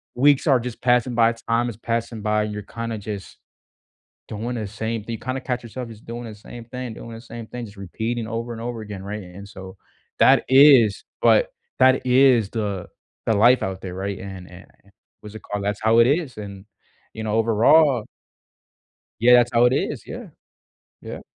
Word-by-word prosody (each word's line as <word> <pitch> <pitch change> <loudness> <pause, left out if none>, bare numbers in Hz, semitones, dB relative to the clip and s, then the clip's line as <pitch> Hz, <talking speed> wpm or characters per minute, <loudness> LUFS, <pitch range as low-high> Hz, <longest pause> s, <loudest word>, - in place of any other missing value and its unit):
weeks 140 +4 +3
are 135 -4 +5
just 120 -1 -7
passing 125 -1 +2
by, 115 0 +4
time 115 +1 -1
is 115 - -7
passing 115 -1 -3
by, 105 0 +1
you're 105 0 -4
kinda 115 +1 -5
just 100 -2 -7 0.9
doing 115 +4 -4
the 110 -3 -4
same 110 +1 -4
thi 115 - -6
you 115 - -4
kinda 130 +1 -4
catch 125 -1 -3
yourself 120 +1 -7
just 110 -1 -13
doing 120 +1 -7
the 110 -2 -8
same 115 +3 -11
thing, 125 -1 -6
doing 115 - -9
the 115 - -10
same 115 -2 -9
thing, 120 0 -7
just 100 -1 -14
repeating 110 +5 -4
over 115 +1 -4
and 115 - -8
over 120 -1 -5
again, 105 -3 -8
right? 105 0 -6
And 90 +3 -11
so, 95 -1 -10 0.4
that - - +5
is 130 -6 +6 0.2
but - - +4 0.3
that 130 0 +4
is 125 -4 +4
the 100 -5 -3 0.4
the 110 - +3
life 120 +5 +5
out 95 0 -4
there, 90 -1 -7
right? 95 +1 -4
And 95 -2 -9
and 90 +1 -13
a - - -26
yeah, - - -22 0.3
what's 105 -1 -11
it 110 - -9
called? 100 -1 -4
That's 105 0 -2
how 110 +1 +3
it 115 - +7
is, 145 -4 0
and, 100 -1 -9 0.5
you 110 - -6
know, 105 - -2
overall 115 +3 +4 1.2
Yeah, 125 +1 +5
that's 120 0 +5
how 120 0 +4
it 125 - +4
is. 135 - -2
Yeah. - - -8 0.7
Yeah. - - -8
115 Hz, 200 wpm, -22 LUFS, 105-120 Hz, 1.2 s, it